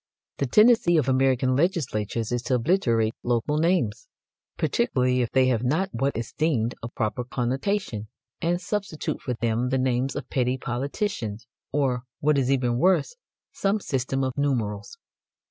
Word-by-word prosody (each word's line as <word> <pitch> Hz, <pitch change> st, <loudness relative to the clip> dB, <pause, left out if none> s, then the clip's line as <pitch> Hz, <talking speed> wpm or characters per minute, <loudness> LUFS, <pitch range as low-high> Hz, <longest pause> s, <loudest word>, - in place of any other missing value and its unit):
The 140 Hz, -, 0 dB
tendency 210 Hz, -, +5 dB
of 145 Hz, -4 st, +1 dB
American 130 Hz, -1 st, +2 dB
legislators 120 Hz, -, -1 dB
is 120 Hz, -1 st, 0 dB
to 130 Hz, -, +3 dB
obliterate 115 Hz, -, +2 dB
local 120 Hz, +5 st, 0 dB
names, 180 Hz, -, +1 dB, 0.5 s
particularly 125 Hz, -, +1 dB
if 120 Hz, -, 0 dB
they 130 Hz, -1 st, +3 dB
have 120 Hz, -2 st, +1 dB
not 160 Hz, +10 st, +1 dB
what 140 Hz, -2 st, -1 dB
is 115 Hz, 0 st, -5 dB
deemed 130 Hz, -7 st, 0 dB
a 115 Hz, -, -4 dB
proper 115 Hz, 0 st, -2 dB
connotation, 125 Hz, -, -2 dB, 0.3 s
and 175 Hz, +1 st, +1 dB
substitute 200 Hz, -5 st, -3 dB
for 125 Hz, -, -3 dB
them 115 Hz, +1 st, 0 dB
the 130 Hz, -, +1 dB
names 130 Hz, 0 st, 0 dB
of -, -, -5 dB
petty 125 Hz, 0 st, +1 dB
politicians 125 Hz, -, -3 dB, 0.3 s
or, 135 Hz, -4 st, +1 dB, 0.2 s
what 150 Hz, -1 st, +3 dB
is 130 Hz, -1 st, 0 dB
even 125 Hz, -3 st, +1 dB
worse, 190 Hz, -, +2 dB, 0.4 s
some 200 Hz, +2 st, 0 dB
system 135 Hz, -5 st, -1 dB
of 130 Hz, -1 st, -2 dB
numerals. 125 Hz, -, -1 dB
130 Hz, 150 wpm, -25 LUFS, 120-155 Hz, 0.5 s, tendency